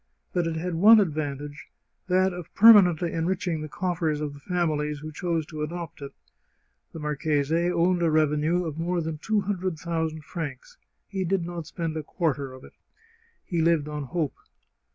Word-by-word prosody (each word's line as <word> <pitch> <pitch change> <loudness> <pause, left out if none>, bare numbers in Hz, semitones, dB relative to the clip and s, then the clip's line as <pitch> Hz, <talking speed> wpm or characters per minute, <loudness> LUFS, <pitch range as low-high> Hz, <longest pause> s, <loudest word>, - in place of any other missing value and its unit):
But 175 -2 +1
it 165 - -2
had 175 +2 -3
one 215 +7 +7
advantage, 145 -4 -3 0.4
that 185 0 +3
of 175 -2 -8
permanently 185 -6 +7
en 165 0 -1
riching 180 -3 -1
the 155 - -5
coffers 165 -4 -1
of 150 -1 -3
the 145 - -12
families 150 -3 -1
who 155 +2 -8
chose 165 0 -2
to 155 -1 -7
adopt 165 0 -5
it. 140 - -7 0.8
The - - -9
marchese 150 +2 0
owned 175 +1 +2
a 170 - +3
revenue 155 +3 +2
of 160 -1 -5
more 175 +1 0
than 160 -2 -4
two 215 +5 +1
hundred 185 -3 -2
thousand 160 -1 -3
francs; 145 -5 -6 0.3
he 195 -2 -3
did 185 -1 0
not 170 -2 -6
spend 165 -2 -4
a - - -2
quarter 145 -4 -2
of 130 0 -12
it. - - -14 0.7
He 170 -4 -1
lived 160 -2 +2
on 150 -1 -4
hope. 155 0 -2
165 Hz, 175 wpm, -26 LUFS, 150-175 Hz, 0.8 s, one